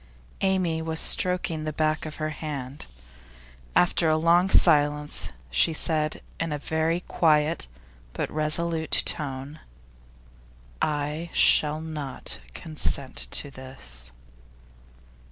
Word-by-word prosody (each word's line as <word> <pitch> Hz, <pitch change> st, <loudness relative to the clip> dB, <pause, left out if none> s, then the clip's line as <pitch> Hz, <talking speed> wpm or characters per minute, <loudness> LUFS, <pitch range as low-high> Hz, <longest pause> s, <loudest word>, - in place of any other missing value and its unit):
Amy 185 Hz, -4 st, +1 dB
was 160 Hz, 0 st, -2 dB
stroking 180 Hz, -3 st, +3 dB
the 155 Hz, -, -2 dB
back 155 Hz, +1 st, -1 dB
of 155 Hz, -, -7 dB
her 155 Hz, 0 st, -3 dB
hand. 145 Hz, -3 st, -6 dB, 0.9 s
After 175 Hz, -2 st, +4 dB
a 155 Hz, -, +3 dB
long 170 Hz, +3 st, +3 dB
silence, 150 Hz, -3 st, +3 dB, 0.2 s
she 160 Hz, -, +3 dB
said 155 Hz, -1 st, 0 dB, 0.2 s
in 165 Hz, -1 st, -2 dB
a 150 Hz, -, -1 dB
very 160 Hz, +3 st, -1 dB
quiet, 155 Hz, -, +1 dB, 0.5 s
but -, -, -3 dB
very -, -, -9 dB
resolute 160 Hz, +1 st, +1 dB
tone: 140 Hz, +1 st, -2 dB, 1.2 s
'I 150 Hz, +2 st, -2 dB
shall 150 Hz, +1 st, +4 dB
not 150 Hz, -4 st, -4 dB, 0.2 s
consent 150 Hz, -4 st, 0 dB
to 145 Hz, -, -2 dB
this. 60 Hz, -, -8 dB
155 Hz, 110 wpm, -26 LUFS, 145-165 Hz, 1.2 s, After